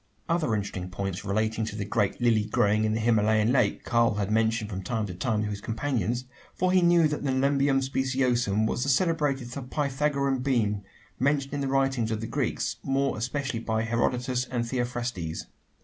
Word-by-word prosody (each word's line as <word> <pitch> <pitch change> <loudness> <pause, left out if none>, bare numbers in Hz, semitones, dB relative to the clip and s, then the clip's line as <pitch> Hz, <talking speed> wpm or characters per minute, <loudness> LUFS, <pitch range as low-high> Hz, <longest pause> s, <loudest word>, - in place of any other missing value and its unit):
Other 165 -9 +1
interesting 95 -3 -4
points 95 0 -4
relating 110 +2 0
to 110 -1 -5
the 105 -2 -3
great 100 -1 0
lily 115 -3 +3
growing 105 0 +2
in 110 - +1
the - - 0
Himalayan 110 0 +3
lake, 130 - +2
Karl 115 -2 +2
had 105 0 -1
mentioned 110 0 +1
from 95 0 -4
time 110 +3 -2
to 95 - -6
time 105 +4 -1
to 105 - -2
his 100 0 -5
companions: 120 0 -1 0.3
for 185 0 +1
he 185 0 +4
knew 170 -2 +5
that 150 -1 -3
the 140 - 0
Nelumbium 135 +1 +2
speciosum 125 -5 +1
was 115 - -1
the 135 - 0
celebrated 140 -5 +1 0.2
Pythagorean 140 -1 0
bean 110 -6 0 0.4
mentioned 140 +1 +1
in 145 - -2
the 135 - -1
writings 135 -4 +1
of 110 -1 -1
the 115 - -4
Greeks 115 - -2
more 135 0 0
especially 130 +2 -2
by 110 -1 -1
Herodotus 125 +2 0
and 120 -2 -2
Theophrastes. 120 -9 -3
120 Hz, 180 wpm, -27 LUFS, 110-135 Hz, 0.4 s, knew